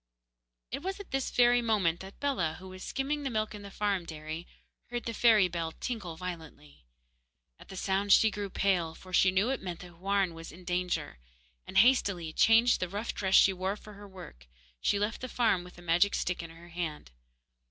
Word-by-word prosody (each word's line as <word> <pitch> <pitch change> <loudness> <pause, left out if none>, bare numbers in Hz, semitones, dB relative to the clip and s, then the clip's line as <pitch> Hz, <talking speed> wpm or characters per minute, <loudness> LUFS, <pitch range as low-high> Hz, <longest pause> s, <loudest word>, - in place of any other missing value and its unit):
It 275 +4 -3
was 385 +3 -4
at 405 - -10
this 270 -1 -1
very 245 0 +4
moment 200 -8 +1
that 190 +1 -11
Bellah, 185 - 0
who 190 +2 -11
was 185 0 -10
skimming 285 +2 -2
the 275 - -2
milk 215 -3 -1
in 210 - -8
the 200 - -9
farm 200 -2 -1
dairy, 155 +1 -7 0.4
heard 240 0 -3
the 230 - -3
fairy 220 -4 +5
bell 165 -2 -3
tinkle 200 -10 -5
violently. 160 - -9 0.7
At - - -15
the 190 - -9
sound 195 +2 0
she 220 +2 +6
grew 205 -1 -4
pale, 180 -4 0
for 185 0 -13
she 185 - +5
knew 195 +7 +2
it 270 - -2
meant 175 -3 -6
that 180 0 -11
Houarn 190 +1 0
was 165 0 -9
in 180 +3 -13
danger; 180 - -2 0.5
and, 190 - -4
hastily, 195 -8 +3
changing 225 +5 +5
the 185 - -2
rough 205 +5 -3
dress 190 -1 +1
she 195 - +7
wore 190 +2 -2
for 210 0 -13
her 205 0 -11
work, 175 - -12 0.3
she 205 - +2
left 210 +3 -2
the 255 - -5
farm 225 -8 +2
with 180 - -13
the 175 - -14
magic 175 +4 +3
stick 180 0 -1
in 165 - -8
her 165 +1 -14
hand. 165 - -5
190 Hz, 205 wpm, -30 LUFS, 175-220 Hz, 0.7 s, she